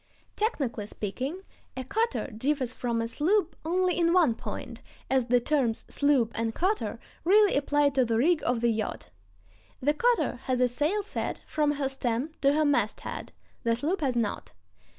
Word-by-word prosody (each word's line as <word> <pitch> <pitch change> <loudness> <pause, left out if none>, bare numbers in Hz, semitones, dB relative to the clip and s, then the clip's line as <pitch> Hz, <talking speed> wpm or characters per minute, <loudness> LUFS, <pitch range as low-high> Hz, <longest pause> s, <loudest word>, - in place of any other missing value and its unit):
Technically 270 - -1
speaking, 260 - -4 0.3
a 260 - -3
cutter 450 - -1
differs 255 +1 0
from 235 -2 -1
a - - -2
sloop 335 - +1
only 360 +2 +1
in 335 0 +3
one 335 -10 +4
point, - - -7 0.3
as 260 -2 +3
the 245 +1 +3
terms 245 -3 0
"sloop" 275 -6 +2
and 225 0 -2
"cutter" 400 +5 -1 0.2
really 410 +3 +5
apply 290 +1 +2
to 270 -2 +2
the 230 -2 0
rig 320 +7 +3
of 240 -2 0
the 235 0 +3
yacht. 215 -1 -4 0.7
The 290 +3 +2
cutter 480 +9 +1
has 255 -1 0
a 250 - +4
sail 300 - 0
set 415 - -4
from 300 -1 +1
her 280 -2 -1
stem 265 +1 -1
to 275 0 +4
her 305 +1 +2
masthead; 240 -7 -1 0.3
the 230 0 +1
sloop 315 +9 -1
has 265 -4 0
not. 225 -4 -2
280 Hz, 170 wpm, -28 LUFS, 240-335 Hz, 0.7 s, really